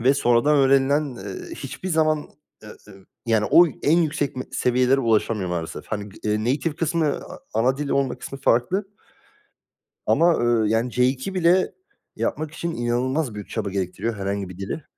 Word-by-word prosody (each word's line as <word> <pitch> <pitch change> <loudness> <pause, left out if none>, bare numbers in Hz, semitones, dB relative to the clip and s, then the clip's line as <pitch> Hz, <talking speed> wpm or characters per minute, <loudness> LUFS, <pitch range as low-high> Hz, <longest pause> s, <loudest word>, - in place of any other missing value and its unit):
Ve 130 +4 +4
sonradan 130 +3 +3
öğrenilen, 140 +2 +4
eee, 95 0 -7
hiçbir 145 +7 -6
zaman, 155 -2 +1 0.4
eee, 110 - -11 0.6
yani 110 -2 +2
o 175 +1 +8 0.2
en 160 +4 +4
yüksek 150 -4 -1
me 130 - -3
seviyelere 125 +2 +2
ulaşamıyor 110 -5 +1
maalesef. 85 -2 -4
Hani, 105 -1 -4 0.2
eee, 105 0 +1
native 140 +7 -1
kısmı, 165 -1 0
a - - -9 0.2
ana 125 +4 +2
dili 145 0 -2
olmak 135 -2 0
kısmı 135 - -7
farklı. 140 - +2 1.2
Ama 170 0 +4
eee, 115 -3 +2
yani 115 +2 +1
C2 130 +8 0
bile 180 +1 +3 0.4
yapmak 155 -1 -2
için, 170 +2 -4
inanılmaz 125 +2 -1
büyük 105 - -8
çaba 105 -3 -3
gerektiriyor, 100 +4 -3
herhangi 100 -1 -3
bir 90 - -10
dili. 100 +10 -5
130 Hz, 155 wpm, -23 LUFS, 110-150 Hz, 1.2 s, o